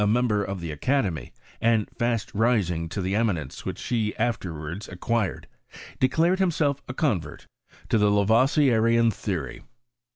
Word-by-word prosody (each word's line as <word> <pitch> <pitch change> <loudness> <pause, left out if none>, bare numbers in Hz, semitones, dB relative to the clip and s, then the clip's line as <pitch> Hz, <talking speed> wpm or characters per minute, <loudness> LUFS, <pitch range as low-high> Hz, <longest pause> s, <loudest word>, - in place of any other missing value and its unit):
member 110 -2 +2
of 100 -1 -4
the 85 -2 -4
academy, 95 - -1 0.3
and 115 -2 +2
tast 120 -2 -1
ming 100 -7 +1
to 100 - -4
tlie 95 +2 -1
eminence 100 - -1
which - - -4
he 110 -3 0
afterwards 85 -5 -3
acquired, 100 +3 -2 0.5
de 130 - +3
clared 170 +6 +2
himself 155 -6 +1
a - - -3
convert 100 - -1 0.4
to 115 - +2
the 105 0 +4
Laroi^ieaian 115 +2 +3
theory. 85 - -4
110 Hz, 135 wpm, -25 LUFS, 95-120 Hz, 0.5 s, the